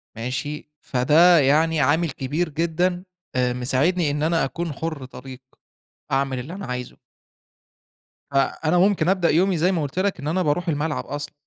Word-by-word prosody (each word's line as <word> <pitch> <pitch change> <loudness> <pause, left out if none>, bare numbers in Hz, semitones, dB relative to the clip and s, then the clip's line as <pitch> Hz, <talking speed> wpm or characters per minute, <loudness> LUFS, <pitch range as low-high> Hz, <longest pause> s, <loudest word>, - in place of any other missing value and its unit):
ماشي، 130 +7 -4
فده 155 +7 +4
يعني 150 +3 +3
عامل 160 +5 +2
كبير 145 +6 -2
جدًا 170 +3 -1 0.3
آآ 125 -1 +1
مساعدني 145 +7 +1
إن 150 +1 -2
أنا 165 -2 +2
أكون 165 +3 -4
حُر 155 -2 -5
طليق، 130 0 -11 0.7
أعمل 135 -1 0
اللي 140 +8 -7
أنا 195 - -7
عايزه. 125 -1 -6 1.3
فأنا 155 +4 +1
ممكن 180 -3 +3
أبدأ 185 -3 +2
يومي 180 +3 +2
زي 175 +4 +2
ما 170 -4 0
قُلت 145 +5 -3
لَك 200 +1 0
إن 140 - -5
أنا 180 +4 0
باروح 170 +3 0
الملعب 150 0 -2
أصلًا، 145 +1 -6
155 Hz, 155 wpm, -23 LUFS, 135-170 Hz, 1.3 s, فده